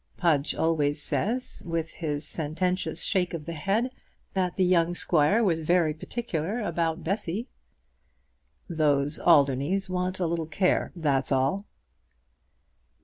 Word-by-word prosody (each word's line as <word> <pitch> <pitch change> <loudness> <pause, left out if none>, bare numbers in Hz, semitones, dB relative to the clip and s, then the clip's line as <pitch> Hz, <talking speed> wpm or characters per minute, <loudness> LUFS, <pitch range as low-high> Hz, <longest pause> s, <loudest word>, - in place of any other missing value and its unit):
Pudge 160 -4 +1
always 150 -2 +1
says, 235 - -2
with 165 -1 -3
his 150 -3 -3
sententious 180 +4 -1
shake 180 -4 0
of 150 -3 -7
the 170 - -5
head, 200 - 0 0.4
that 185 -2 0
the 185 - +2
young 175 -1 +3
squire 175 +8 +3
was 170 -6 +2
very 165 -1 +2
particular 195 +2 -3
about 170 -5 -1
Bessy." 200 +4 -2 1.2
"Those 150 -3 +1
Alderneys 150 +5 +3
want 185 +1 -1
a 180 - +1
little 165 -1 -1
care, 185 +3 +1
that's 145 -6 0
all." 135 +10 +1
170 Hz, 125 wpm, -27 LUFS, 155-185 Hz, 1.2 s, young